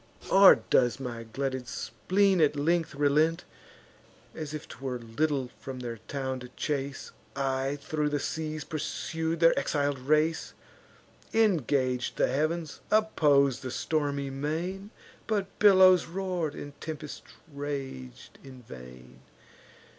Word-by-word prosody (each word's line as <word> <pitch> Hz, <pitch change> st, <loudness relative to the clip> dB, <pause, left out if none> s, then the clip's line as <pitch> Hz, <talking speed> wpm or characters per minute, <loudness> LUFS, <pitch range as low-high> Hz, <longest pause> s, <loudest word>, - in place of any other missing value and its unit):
Or 195 Hz, 0 st, +9 dB, 0.2 s
does 125 Hz, 0 st, +3 dB
my 120 Hz, -3 st, -5 dB
glutted 130 Hz, -1 st, -3 dB
spleen 190 Hz, +9 st, +1 dB
at 150 Hz, -1 st, +3 dB
length 165 Hz, +1 st, 0 dB
relent? 150 Hz, +4 st, +2 dB, 0.9 s
As 155 Hz, -2 st, -6 dB
if 155 Hz, -1 st, -6 dB
'twere 130 Hz, +1 st, -5 dB
little 130 Hz, +3 st, -2 dB
from 130 Hz, -1 st, -7 dB
their 120 Hz, -2 st, -5 dB
town 130 Hz, -2 st, -3 dB
to 125 Hz, 0 st, -10 dB
chase, 140 Hz, -2 st, -3 dB, 0.2 s
I 135 Hz, 0 st, -1 dB
thro' 150 Hz, +1 st, -2 dB
the 145 Hz, 0 st, -1 dB
seas 155 Hz, 0 st, -3 dB
pursued 160 Hz, +2 st, -3 dB
their 165 Hz, 0 st, +7 dB
exil'd 145 Hz, -2 st, 0 dB
race; 155 Hz, +4 st, +1 dB, 0.8 s
Ingag'd 140 Hz, -, +1 dB
the -, -, +4 dB
heav'ns, 155 Hz, +2 st, -1 dB
oppos'd 145 Hz, -, +3 dB
the 130 Hz, -, -5 dB
stormy 140 Hz, 0 st, -1 dB
main; 165 Hz, +8 st, -3 dB, 0.4 s
But 200 Hz, -3 st, -2 dB
billows 185 Hz, -3 st, +7 dB
roar'd, 175 Hz, -4 st, -3 dB
and 145 Hz, -, -8 dB
tempests 155 Hz, -2 st, -6 dB, 0.3 s
rag'd 135 Hz, -, -6 dB
in 130 Hz, -2 st, -12 dB
vain. 65 Hz, -, -12 dB
145 Hz, 120 wpm, -28 LUFS, 130-165 Hz, 0.9 s, Or